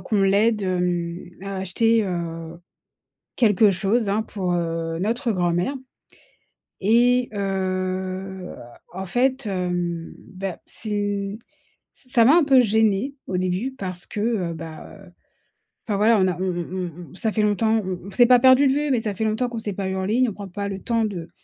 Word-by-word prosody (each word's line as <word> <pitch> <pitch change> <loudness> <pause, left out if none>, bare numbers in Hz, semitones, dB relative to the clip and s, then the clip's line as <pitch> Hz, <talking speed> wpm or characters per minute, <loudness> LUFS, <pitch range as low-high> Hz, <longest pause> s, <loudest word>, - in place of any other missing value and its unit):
qu'on 210 -2 0
l'aide, 205 +2 +3
hem, 180 -1 -2
à 195 0 -5
acheter, 220 +4 +2
heu, 170 -2 -5 0.8
quelque 215 -3 +5
chose, 200 +3 0
hein, 210 - +1
pour, 190 -5 -3
heu, 165 -1 -2
notre 230 +4 0
grand-mère 175 +5 0 1.1
et 245 +3 +4
heu, 190 -1 -3 0.4
en 190 +1 -5
fait, 255 +6 0
hem, 175 -3 -2 0.2
bah, 190 -1 -4
c'est 205 -1 -3 0.6
ç 255 - -21
ça 235 -3 +6
m'a 280 - +7
un 345 - +5
peu 270 -2 +5
gêné, 220 +4 +1
au 185 - -1
début, 185 +8 -1
parce 185 -3 -6
que, 210 - -6
heu, 210 -7 0
bah 160 +3 -9 0.9
enfin, 205 -3 0
voilà, 220 +2 +4
on 190 - +3
a 180 -2 -1
on 190 - 0
on 175 +1 -4 0.2
on - - -14
ça 220 +3 -1
fait 215 - +1
longtemps 220 +1 +2
on 185 -1 -3
on 200 - -8
s'est 240 +5 +5
pas 250 0 +7
perdu 260 +2 +6
de 265 - +3
vue 295 +1 0
mais 250 - +3
ça 210 -2 -2
fait 200 - -3
longtemps 220 +4 0
qu'on 235 -1 -5
s'est 210 -2 -4
pas 190 0 -3
eu 190 - -2
en 190 0 -2
ligne. 240 +4 +2
On - - -6
prend 200 0 -8
pas 200 +2 -4
le 195 -1 -5
temps 230 -1 0
de 175 -6 -5
195 Hz, 180 wpm, -23 LUFS, 185-225 Hz, 1.1 s, m'a